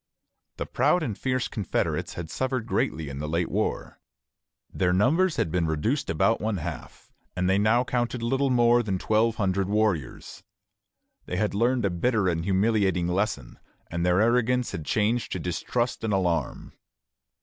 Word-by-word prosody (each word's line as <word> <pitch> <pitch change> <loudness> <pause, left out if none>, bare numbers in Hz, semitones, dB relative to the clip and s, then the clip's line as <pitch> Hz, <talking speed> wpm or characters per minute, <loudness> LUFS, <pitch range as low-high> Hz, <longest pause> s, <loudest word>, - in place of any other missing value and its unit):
The - - -3
proud 180 -2 +2
and 115 -9 -3
fierce 130 +1 -1
confederates 100 -5 -2
had 85 -2 -6
suffered 130 -3 -2
greatly 80 -9 -1
in 70 0 -6
the 75 +1 -4
late 85 +2 -1
war. - - -2 0.7
Their 90 -2 +1
numbers 155 - +3
had 80 - -1
been 85 -1 0
reduced 95 - -1
about 85 +8 +2
one 110 -2 -1
half, 85 -1 -8 0.2
and 90 0 0
they 95 +1 +3
now 110 +4 +3
counted 120 -1 -2
little 135 +3 +1
more 120 -1 +4
than 100 -5 -2
twelve 110 +4 +1
hundred 95 -2 0
warriors. 100 - -1 0.9
They 90 - -3
had 105 +1 0
learned 120 +3 +1
a 100 - +1
bitter 105 +3 +1
and 80 -2 0
humiliating 95 -2 +1
lesson, 90 - -2 0.3
and 85 0 -2
their 90 +1 +3
arrogance 125 +2 +2
had 80 - -6
changed 110 +6 0
to 95 - -3
distrust 115 +9 -2
and 110 - -1
alarm. 85 -7 -1
105 Hz, 160 wpm, -26 LUFS, 90-120 Hz, 0.9 s, more